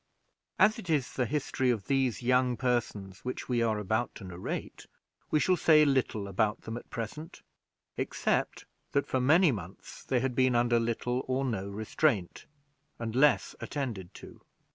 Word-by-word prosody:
As 215 +2 +4
it 185 - -9
is 145 -5 0
the 125 -2 0
history 130 -2 -1
of 110 -6 0
these 135 -3 0
young 125 0 +2
persons 110 -7 -2
which 125 - -5
we 120 -2 +1
are 110 -2 +1
about 110 +4 -1
to - - -10
narrate, 90 -1 -6 0.4
we 155 - +3
shall 185 +4 +3
say 155 -3 +5
little 130 -7 0
about 105 +2 0
them 110 - -6
at 120 - -9
present, 135 - -7 0.5
except - - -1 0.3
that 140 - +2
for 130 - -1
many 160 +5 +5
months 95 -5 -8
they 130 - +1
had 130 +1 -1
been 130 0 +3
under 120 0 +3
little 120 +2 -1
or 130 +1 0
no 100 -6 -2
restraint, 105 - -1 0.5
and 115 -1 -4
less 140 0 +3
attended 115 -11 -4
to. - - -12
125 Hz, 165 wpm, -30 LUFS, 110-135 Hz, 0.5 s, say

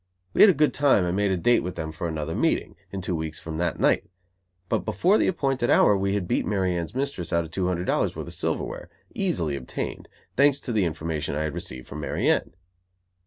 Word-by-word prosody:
We - - +3
had 210 - +10
a 185 - +4
good 150 +1 +3
time, 135 -10 +3
and 90 +1 -1
made 100 0 +2
a 95 - +1
date 120 +8 +4
with 90 - -5
them 80 -2 -4
for 80 +2 -4
another 80 -1 -3
meeting, - - 0 0.2
in 95 - -4
two 90 -1 -1
weeks 80 -1 -4
from 80 -1 -6
that 85 -2 -1
night; - - +3 0.6
but - - +1
before 170 - +2
the - - +2
appointed 135 -8 0
hour 105 - +5
we 100 0 0
had 95 -4 -2
beat - - +1
Mary 95 -4 0
Anne's 85 +6 -4
mistress 130 - -2
out 85 -1 +2
of 80 - -10
two 90 +1 -1
hundred 90 -1 -1
dollars - - 0
worth - - -5
of - - -6
silverware, - - -3 0.2
easily 115 - 0
obtained, 65 -3 -5 0.3
thanks 140 +1 +4
to 125 - -5
the 105 -5 +2
information 80 -3 -3
I 75 - -1
had 80 -2 -2
received 65 0 -6
from 75 - -7
Mary 75 - -1
Anne. - - +1
90 Hz, 230 wpm, -25 LUFS, 80-120 Hz, 0.6 s, had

